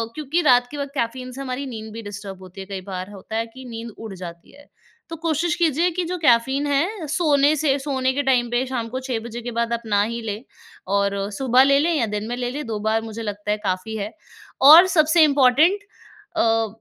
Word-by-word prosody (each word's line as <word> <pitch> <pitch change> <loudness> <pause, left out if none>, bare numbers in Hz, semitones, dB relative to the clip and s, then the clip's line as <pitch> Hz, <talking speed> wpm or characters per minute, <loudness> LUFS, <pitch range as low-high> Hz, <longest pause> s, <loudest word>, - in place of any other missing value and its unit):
क्योंकि 305 +3 -1
रात 245 -5 +4
के 295 - -7
वक़्त 280 -1 -4
कैफ़ीन 255 +1 -3
से 265 +2 -8
हमारी 265 +1 -4
नींद 220 -4 -7
भी 230 - -7
डिस्टर्ब 200 -2 -8
होती 185 +1 -10
है - - -8
कई 195 -1 -5
बार 185 +2 -5
होता 205 +2 -8
है 225 +1 0
कि 260 0 -11
नींद 230 0 -7
उड़ 220 -3 -8
जाती 170 -2 -10
है। 290 - -17 0.4
तो 330 - -5
कोशिश 330 +1 0
कीजिए 335 0 +2
कि 365 - +1
जो 360 +2 -3
कैफ़ीन 265 0 +3
है 320 +5 -1
सोने 295 -2 +3
से 285 -2 +1
सोने 265 -2 -1
के 285 +2 -1
टाइम 250 -3 +2
पे 240 +2 +1
शाम 245 -3 -3
को 255 +3 -4
6 255 -3 -3
बजे 235 0 -6
के 240 +1 -5
बाद 235 0 -1
आप 235 - -2
ना 205 -2 +2
ही 235 +2 -4
लें 215 0 -5 0.5
और 200 0 +1 0.2
सुबह 255 +3 +3
ले 275 +1 +4
लें 335 +4 +1
या 280 -8 +1
दिन 210 +1 -3
में 240 - -3
ले 245 -1 -2
लें 295 +3 -5
2 220 -2 -3
बार 220 +1 0
मुझे 225 0 -7
लगता 205 -1 -4
है 210 - +1
काफ़ी 190 +3 -2
है। 205 +1 -4 0.6
और 345 +4 +10
सबसे 315 +1 +5
इम्पॉर्टेंट 290 +6 +4 0.6
अ, 225 0 +2
245 Hz, 230 wpm, -22 LUFS, 220-285 Hz, 0.6 s, और